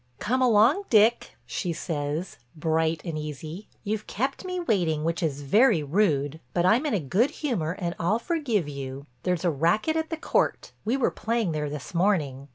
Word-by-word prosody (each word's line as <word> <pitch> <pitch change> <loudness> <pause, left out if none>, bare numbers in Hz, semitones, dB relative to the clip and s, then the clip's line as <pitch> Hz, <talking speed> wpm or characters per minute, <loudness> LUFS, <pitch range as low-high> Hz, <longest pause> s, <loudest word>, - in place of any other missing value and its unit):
"Come 255 +4 0
along, 245 - +4
Dick," 225 +1 +3
she 175 -3 -3
says, 155 +1 -3 0.2
bright 160 0 0
and 160 -3 -3
easy, 155 +6 -7 0.2
"you've 210 0 -3
kept 265 +6 -2
me 365 -1 -3
waiting 175 - +1
which 165 +2 -1
is 145 -4 -1
very 205 - +4
rude, 150 -3 +1 0.2
but 175 - +2
I'm 235 +11 +4
in 275 - +1
a - - +1
good 190 - +2
humor 230 - -2
and 170 -2 -2
I'll 180 +6 +2
forgive 235 - -1
you. 140 -1 -6 0.2
There's 180 +1 -1
a 175 - +3
racket 170 - +1
at 320 0 -1
the 325 - -3
court—we 255 -5 -1
were 270 - +2
playing 225 -5 -1
there 150 -1 -2
this 145 +2 -7
morning. 155 -7 0
180 Hz, 175 wpm, -26 LUFS, 155-230 Hz, 0.2 s, along